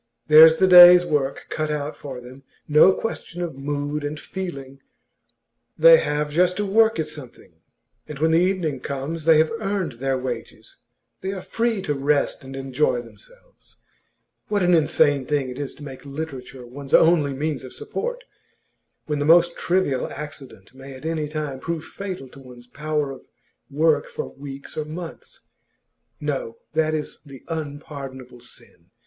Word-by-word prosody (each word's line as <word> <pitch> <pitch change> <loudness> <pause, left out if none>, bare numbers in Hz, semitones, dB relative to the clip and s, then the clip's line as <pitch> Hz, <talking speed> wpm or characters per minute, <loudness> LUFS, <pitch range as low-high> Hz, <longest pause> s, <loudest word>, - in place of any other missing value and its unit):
There's 160 +1 +9
the 190 - +4
day's 180 -1 +10
work 140 -4 -1
cut 155 -1 -2
out 150 0 -3
for 135 -3 -8
them; 125 +2 -13 0.3
no 150 +5 +6
question 180 -4 -5
of 170 - -4
mood 145 +1 -3
and 145 +1 -4
feeling; 140 -8 -7 1.0
they - - +8
have 150 - -1
just 180 +3 +2
to 205 - -1
work 220 +3 +3
at 155 - -1
something, 150 -5 -10 0.5
and 150 - -7
when 160 +3 +2
the 165 - +4
evening 180 -6 0
comes, 140 +5 -5
they 165 -1 +6
have 155 +1 +3
earned 195 -6 -2
their 135 0 0
wages, 125 -2 -7 0.4
they 190 - -3
are 195 - -5
free 225 +1 -2
to 150 - -1
rest 140 0 0
and 135 0 -9
enjoy 135 -2 0
themselves. - - -17 0.7
What 205 -2 0
an 180 0 +3
insane 150 -4 +3
thing 145 -3 0
it 125 - -8
is 140 -2 -5
to 150 - -12
make 135 -3 -9
literature 135 -3 -7
one's 135 +3 -2
only 160 -4 +4
means 145 -1 -3
of 130 - -9
support! - - -5 0.8
When 150 -1 -2
the 145 - 0
most 170 +2 +5
trivial 170 -8 0
accident 135 -9 -10
may 135 +1 -11
at 130 - -12
any 160 -2 -2
time 150 -3 -5
prove 165 +2 -4
fatal 185 -8 -7
to 140 - -15
one's 125 -2 -14
power 150 +2 -3
of 130 - -12 0.4
work 150 0 +2
for - - -6
weeks 140 0 -10
or 155 - -2
months. 170 - -9 0.8
No, 470 -2 -4 0.2
that 155 0 +1
is 150 - -5
the 140 -4 -13
unpardonable 140 -5 -7
sin! 120 - -13
150 Hz, 165 wpm, -23 LUFS, 135-170 Hz, 1.0 s, day's